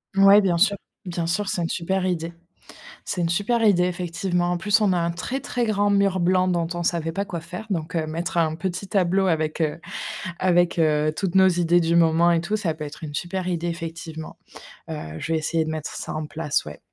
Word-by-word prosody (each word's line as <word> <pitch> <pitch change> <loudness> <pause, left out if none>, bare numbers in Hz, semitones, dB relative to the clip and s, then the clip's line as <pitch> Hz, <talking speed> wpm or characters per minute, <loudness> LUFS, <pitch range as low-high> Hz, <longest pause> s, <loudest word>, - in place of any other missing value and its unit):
Ouais, 195 +1 +7
bien 180 -4 +1
sûr, 200 +3 +3 0.3
bien 170 -2 -3
sûr, 195 +4 0
c'est 180 - -1
une 165 - -1
super 185 +2 -1
idée. 170 -2 -2 0.7
C'est 185 - -3
une 170 - +1
super 205 +7 +1
idée 180 -4 +4
effectivement. 180 0 -1
En 175 - -1
plus, 210 +4 +2
on 205 -3 +3
a - - +1
un 170 0 0
très 245 +11 -4
très 245 -2 -2
grand 205 -1 +1
mur 200 -2 +2
blanc 185 +1 +3
dont 170 -2 0
on 175 - -3
savait 165 -1 0
pas 200 +4 -2
quoi 175 -4 -5
faire 170 +7 -8
donc 165 -2 -2
heu, 160 -1 0
mettre 165 +3 -3
un 160 -2 +2
petit 185 +3 -4
tableau 190 0 +2
avec, 155 -2 0
heu 155 +1 -1 0.6
avec, 175 -1 +2
heu, 155 -1 +2
toutes 185 +1 -2
nos 190 0 +6
idées 175 -1 +3
du 165 0 +2
moment 165 +1 +4
et 170 -1 +3
tout, 200 +6 -1
ça 190 -6 -1
peut 155 0 -7
être 145 +2 -9
une 145 -2 -7
super 180 +3 -3
idée 175 -1 -2
effectivement, 165 -1 -6 0.5
heu, 80 - -6
je 165 - -3
vais 160 - +2
essayer 160 +1 0
de 155 - -4
mettre 155 -1 -5
ça - - -5
en 155 0 -3
place, 150 -1 -1
ouais. 75 - -9
175 Hz, 225 wpm, -24 LUFS, 165-190 Hz, 0.7 s, Ouais